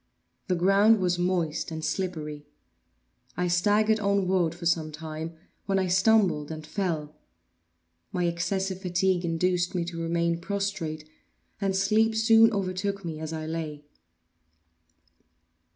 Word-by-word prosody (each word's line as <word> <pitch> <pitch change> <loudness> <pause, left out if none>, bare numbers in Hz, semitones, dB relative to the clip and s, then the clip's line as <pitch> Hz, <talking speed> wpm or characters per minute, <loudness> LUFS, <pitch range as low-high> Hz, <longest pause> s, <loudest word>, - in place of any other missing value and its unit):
The 185 - +1
ground 200 +5 +4
was 180 -1 0
moist 175 -4 0
and 160 -1 -5
slippery. 150 -6 -4 0.9
I 180 0 +1
staggered 210 +5 +3
onward 190 -4 +1
for 175 0 -9
some 165 -2 +1
time, 160 +1 -6 0.3
when 195 -1 +1
I 190 -1 0
stumbled 190 -5 +3
and 155 -1 -7
fell. 155 -4 -3 1.0
My 180 -1 0
excessive 190 +2 -1
fatigue 185 0 +1
induced 175 +2 0
me 175 -2 0
to 170 -1 -5
remain 170 0 0
prostrate; 170 -5 -3 0.5
and 195 -1 0
sleep 215 +3 +2
soon 225 0 +6
overtook 195 -1 -2
me 160 -2 -5
as 160 0 -5
I 160 -1 -4
lay. 155 -2 -5
180 Hz, 125 wpm, -27 LUFS, 160-195 Hz, 1.0 s, soon